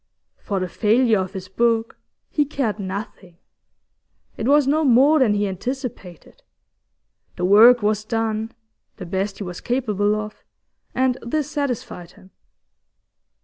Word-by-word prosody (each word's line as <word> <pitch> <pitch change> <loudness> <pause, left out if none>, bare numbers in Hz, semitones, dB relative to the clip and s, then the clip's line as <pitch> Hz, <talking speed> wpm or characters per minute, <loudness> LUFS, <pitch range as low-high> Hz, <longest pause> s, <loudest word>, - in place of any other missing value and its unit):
For 200 -2 -3
the 185 - -2
failure 220 +3 +2
of 185 -1 -4
his 185 -1 -7
book 230 +3 0 0.4
he 295 - +2
cared 265 -7 -3
nothing. 190 -2 -7 1.0
It 220 - -3
was 290 0 +4
no 305 +4 +2
more 275 +4 +5
than 225 -6 +3
he 205 0 0
anticipated. 195 - -7 0.9
The 180 - -2
work 225 +5 +7
was 210 0 0
done 225 0 -2 0.5
the 190 - -7
best 190 +3 -3
he - - -5
was 180 -2 -7
capable 210 -5 0
of 215 0 -7 0.5
and 260 -1 +1
this 295 +4 -3
satisfied 245 - -4
him. 190 - -19
220 Hz, 135 wpm, -21 LUFS, 195-255 Hz, 1.0 s, work